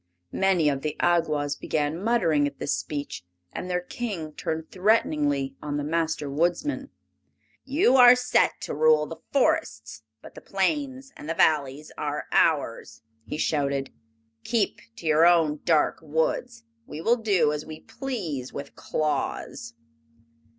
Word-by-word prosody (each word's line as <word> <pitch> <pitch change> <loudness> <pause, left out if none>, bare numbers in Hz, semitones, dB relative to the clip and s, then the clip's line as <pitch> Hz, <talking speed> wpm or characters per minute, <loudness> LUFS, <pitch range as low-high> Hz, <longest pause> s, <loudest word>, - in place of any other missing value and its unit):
Many 190 -5 +2
of 140 -2 0
the 150 +1 -3
Awgwas 155 -4 +1
began 150 +1 -1
muttering 170 -10 +2
at - - -8
this 140 - -1
speech, 145 -10 -4 0.3
and 180 - -5
their 180 0 0
King 180 -6 -5
turned 160 +1 -4
threateningly 150 -9 +1
on 145 -1 -3
the 145 - -2
Master 160 -1 -1
Woodsman. 175 - -1 0.8
"You 270 -1 +3
are 245 -1 +9
set 250 0 +2
to - - -4
rule 470 0 +4
the - - -8
forests, 315 +4 0 0.2
but - - -12
the - - -11
plains 275 -3 -2
and 150 - -9
the 165 - -1
valleys 150 -1 +1
are 150 0 -3
ours!" 145 -7 +1 0.2
he - - -4
shouted. 140 -3 -1 0.5
"Keep 225 -3 0
to 200 - -12
your 160 +2 +5
own 160 -4 +3
dark 160 -3 +2
woods! 160 +10 -2 0.2
We 150 - -7
will 230 +9 +2
do 190 -10 +2
as 150 0 -4
we 155 0 -10
please 180 - -5
with 140 - -7
Claus." 145 -5 -3
160 Hz, 145 wpm, -26 LUFS, 150-225 Hz, 0.8 s, are